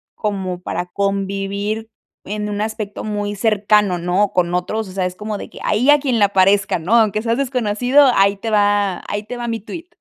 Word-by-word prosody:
como 190 -4 -3
para 180 - -3
convivir 200 +3 -2 0.3
en 210 +1 -4
un 205 0 -3
aspecto 215 -1 -4
muy 205 -1 -3
cercano, 210 -2 +2
¿no?, 180 +4 +1
con 175 -1 +1
otros, 200 +4 -2
o - - -9
sea, 185 -1 -2
es 180 - -8
como 210 +1 -5
de - - -8
que: - - -13
"Ahí, 240 +7 +1
a 295 0 +7
quien 255 -5 0
le 200 -1 +4
parezca", 195 0 +3
¿no? 175 +7 -2
"Aunque 215 -2 +3
seas 230 0 0
desconocido, 250 +1 +3
ahí 200 0 +3
te 225 +2 -4
va 205 -2 +2
ahí 205 +1 -3
te 245 +3 -7
va 240 0 -4
mi 225 -1 -2
tweet". 335 - -9
205 Hz, 205 wpm, -19 LUFS, 195-220 Hz, 0.3 s, a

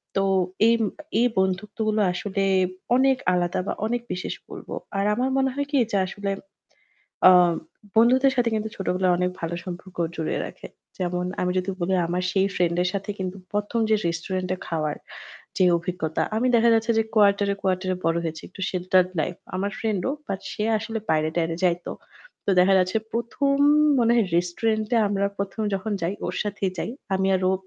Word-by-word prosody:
তো 195 - +2 0.4
এই 230 - +5 0.4
এই 245 - +5
বন্ধুত্বগুলো 210 +3 0
আসলে 195 +2 -2 0.5
অনেক 265 +1 +4 0.2
আলাদা 175 -1 0
বা - - 0
অনেক 240 +2 -1
বিশেষ 180 - -4 0.2
বলবো। - - -8 0.2
আর 195 - +1
আমার 255 +4 0
মনে 270 0 +2
হয় 285 0 -2
কি? 285 - +2 0.2
যে - - +3
আসলে 200 +1 -4 1.0
আ - - +10 0.7
বন্ধুদের 260 +4 +5
সাথে 245 -2 +2
কিন্তু 215 0 -1
ছোটবেলায় 185 -1 +1
অনেক 180 0 0
ভালো 165 0 -3
সম্পর্ক 180 0 -8 0.2
জুড়িয়ে 160 -1 -2
রাখে। - - -10 0.3
যেমন 180 -1 -1 0.2
আমি 180 - +1
যদি 185 +1 -2
বলি 185 +2 +1
আমার 175 +2 -1
সেই 190 0 +2
ফ্রেন্ডের 175 0 +1
সাথে 200 +1 -3
কিন্তু 185 0 -4 0.2
প্রথম 210 +3 -1
যে 215 - +5
রেস্টুরেন্টে 185 +2 -2
খাওয়ার 155 -3 -2 0.6
যে 185 - +4
অভিজ্ঞতা 170 -2 -2
আমি 235 +3 +1
দেখা 235 0 +5
যাচ্ছে 225 +1 +2
যে 225 - +4
কোয়ার্টারে 200 -1 +4
quarter 185 0 0
এ - - -6
বড় 165 0 +2
হয়েছি। 160 -1 -4
একটু 190 - -13
sheltered 185 0 +2
life। 175 +2 -3 0.2
আমার 200 +2 -1
ফ্রেন্ড 215 -4 -1
ও। - - -1 0.2
বাট 195 -1 -3
সে - - -4 0.2
আসলে 225 +1 -4
বাইরে-টাইরে 160 +1 +1
যাইতো। 175 -1 0 0.6
তো - - +2
দেখা 190 +2 +5
যাচ্ছে 185 +3 +1
১ম 235 +4 0 0.4
মনে 235 -1 +4
হয় 225 - +3
রেস্টুরেন্টে 215 +6 0
আমরা 200 0 +1
১ম 200 +2 -3
যখন 195 +3 -3
যাই 175 +4 0
ওর 175 - -3
সাথেই 200 -2 -2
যাই। - - -2 0.2
আমি 190 0 +1
আর 185 - +1
ও - - +2
190 Hz, 175 wpm, -24 LUFS, 180-220 Hz, 1.0 s, আ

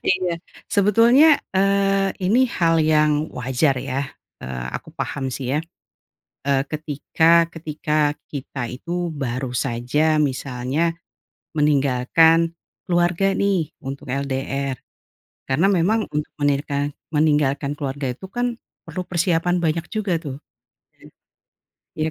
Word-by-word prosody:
Iya, 180 -2 -1 0.3
sebetulnya, 235 +9 +5 0.2
eee, 195 0 +2
ini 210 +8 +3 0.2
hal 165 -1 +4
yang 150 0 +2
wajar 130 +3 +1
ya, 135 +3 -2 0.4
eee, 65 -1 -5
aku - - -8
paham 135 -2 -4
sih 130 +2 -2
ya, - - +2 0.9
eee, 135 -1 +3
ketika 160 +2 +2
ketika 150 -2 -1 0.2
kita 135 -3 -5
itu 170 +6 -3
baru 130 -3 -3
saja, 125 +6 +1
misalnya 140 +3 -1 0.6
meninggalkan 150 +4 +3 0.3
keluarga 175 +2 +2
nih 190 -7 0
untuk 135 +2 -6
LDR. 135 0 -2 0.7
Karena 150 +9 +3
memang 200 +4 +2
untuk 150 0 -2
menirikan 145 0 0 0.2
meninggalkan 145 -2 +2
keluarga 140 -1 -4
itu 190 +9 -11
kan 245 +2 -1 0.3
perlu 185 - -4
persiapan 175 0 +1
banyak 165 +1 +1
juga 195 -6 -1
tuh, 140 -5 -6 1.6
ya. 155 0 0
155 Hz, 110 wpm, -22 LUFS, 140-175 Hz, 1.6 s, sebetulnya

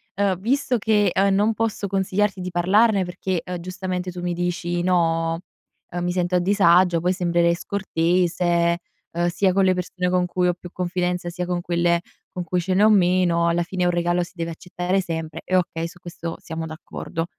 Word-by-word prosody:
uhm, 195 -1 +1
visto 250 +4 +1
che, 205 -3 +2
uhm, 195 0 +3
non 210 +3 +2
posso 220 -2 -2
consigliarti 195 +1 0
di 180 - -3
parlarne 195 +3 +3
perché, 180 -1 -3
uhm, 180 -1 -4
giustamente, 185 0 -4
tu 175 - -7
mi 175 0 -1
dici 175 0 -2
no, 165 -2 +1 0.5
uhm, 175 0 -3
mi 175 - 0
sento 180 0 0
a - - +4
disagio, 180 -2 +4
poi 180 +2 +1
sembrerei 170 -2 +2
scortese, 175 -1 +1 0.3
uhm, 175 +1 0
sia 185 +2 +1
con 195 +1 +3
le 185 0 +3
persone 180 0 -2
con 180 0 +2
cui 180 0 0
ho 180 - +2
più 175 -1 -11
confidenza, 180 -1 -2
sia 180 +1 -4
con 175 0 -2
quelle 170 0 +1 0.3
con 180 - -4
cui 180 +1 -1
ce 185 +2 -1
ne 195 - +4
ho 215 - +7
meno, 180 -4 +3
alla 170 +1 +1
fine 180 +1 -2
un 175 - +3
regalo 175 0 +1
si - - -10
deve 170 -1 -3
accettare 180 +3 -2
sempre, 160 -3 -5
e 185 - -1
okay, 165 -2 0
su 175 +1 -14
questo 170 -1 -6
siamo 160 0 -5
d'accordo. 160 0 -5
180 Hz, 195 wpm, -23 LUFS, 170-185 Hz, 0.5 s, ho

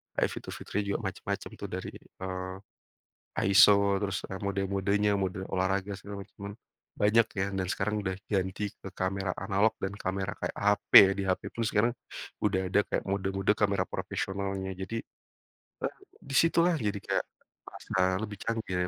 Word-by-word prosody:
kayak - - +2
fitur-fiturnya 105 - -4
juga - - -1
macam-macam - - -4
tuh - - -4
dari, - - -4
eee, 95 0 -6 0.9
ISO, 100 0 +6
terus, 100 -2 -2
eee, 95 - -4
mode-modenya, 100 +1 +1
mode 95 0 -2
olahraga, 95 +2 0
segala 100 +1 -7
macaman, 100 +1 -9 0.5
banyak 110 +2 +5
ya. 95 - +1
Dan 95 -1 -1
sekarang 105 +2 -1
udah 95 -1 -1
ganti 95 0 -1
ke 95 - -9
kamera 95 0 -1
analog 100 +2 +2
dan 95 +1 -3
kamera 95 0 -3
kayak - - -2
HP. 105 0 +1 0.3
Di - - 0
HP 95 -1 +1
pun 115 - -1
sekarang 110 +3 +2 0.5
udah 95 -2 +2
ada 95 - +3
kayak - - -1
mode-mode 95 +1 +1
kamera 100 -3 +1
profesionalnya. 95 0 -3
Jadi, 95 +5 -4 0.9
eee, - - -3 0.2
di 135 - -6
situlah, 170 +2 +4
jadi 105 -8 -1
kayak - - 0 0.5
rasa 95 0 0
lebih 105 -1 -4
canggih 115 -5 -2
100 Hz, 150 wpm, -30 LUFS, 95-105 Hz, 0.9 s, ISO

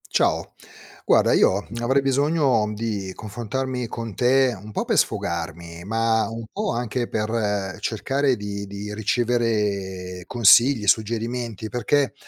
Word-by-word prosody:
Ciao. - - +1 0.5
Guarda, - - +4
io 100 +2 +3
avrei 135 +4 +2
bisogno 135 -4 +2
di 105 -4 -3
confrontarmi 120 +3 -4
con 115 -1 -6
te, 130 +3 +3
un 105 +1 -10
po' - - -1
per - - 0
sfogarmi, 85 0 -2
ma 115 +1 +1
un 115 0 -6
po' 210 0 -2
anche 120 0 -2
per 105 -3 -2
cercare 135 +4 0
di 100 -1 -5
di 100 +1 -6
ricevere 105 -5 -1
consigli, 115 +1 +5
suggerimenti, 115 0 -1
perché, 135 +4 +1
115 Hz, 120 wpm, -23 LUFS, 100-125 Hz, 0.5 s, consigli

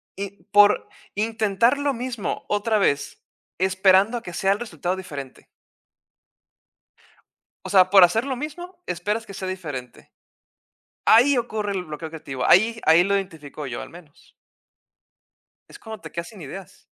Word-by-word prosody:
i 200 0 -7
por 205 0 +5 0.3
intentar 220 +3 +1
lo 285 -1 0
mismo 240 -4 -4
otra 215 +1 +1
vez 145 -8 0 0.4
esperando 190 +4 +3
a - - -6
que 175 - -8
sea 195 +1 +2
el 200 - -5
resultado 180 -6 -3
diferente. 145 -8 -9 2.2
O - - -5
sea, 185 -2 +5
por 195 -1 +8
hacer 220 +8 +3
lo 270 -2 -2
mismo, 345 +7 -8
esperas 205 +6 -2
que 200 - -11
sea 190 -1 -5
diferente. 150 -10 -7 0.9
Ahí 260 +5 +6
ocurre 220 -4 -2
el 185 -2 -3
bloqueo 155 0 -7
creativo. 140 -5 -6
Ahí 225 +5 +4
ahí 160 +2 +6
lo 200 +1 +1
identifico 155 -6 -6
yo, 125 -2 -5
al - - -10
menos. 165 -4 -17 1.4
Es - - -13
cuando 220 - -9
te 160 - -10
quedas 170 0 -5
sin 210 -5 -13
ideas. 185 +6 -10
195 Hz, 150 wpm, -23 LUFS, 170-225 Hz, 2.2 s, por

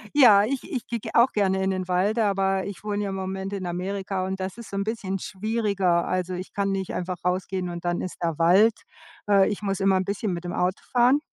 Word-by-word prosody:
Ja, 215 -8 +8
ich 260 +4 -2
ich 255 -5 -4
gehe 235 -2 -5
auch 235 +3 +5
gerne 190 -2 +1
in 190 - +1
den 185 -1 -2
Wald, 190 +5 +1
aber 195 -3 +1
ich 200 -1 -7
wohne 210 -1 -2
ja 200 - -2
im 195 - -4
Moment 190 +1 -4
in 190 -2 -4
Amerika 190 +1 -3
und 190 0 -4
da 185 - -1
isses 215 +4 -8
so - - -6
'n 200 - 0
bisschen 200 -3 -3
schwieriger. 200 -4 0
Also, 185 0 -1
ich 180 +1 -6
kann 200 -1 0
nicht 190 -1 -3
einfach 180 0 -3
rausgehen 180 0 -1
und 175 0 -7
dann 175 0 0
ist 185 - -5
da 165 -3 -1
Wald. 195 +7 +5 0.6
Äh, 195 -2 +5
ich 210 - -4
muss 195 -1 -2
immer 195 -1 +3
'n 185 - -1
bisschen 200 -1 -2
mit 170 +1 -5
dem 175 - -4
Auto 180 +2 0
fahren. 250 +3 +4
195 Hz, 240 wpm, -25 LUFS, 185-205 Hz, 0.6 s, Ja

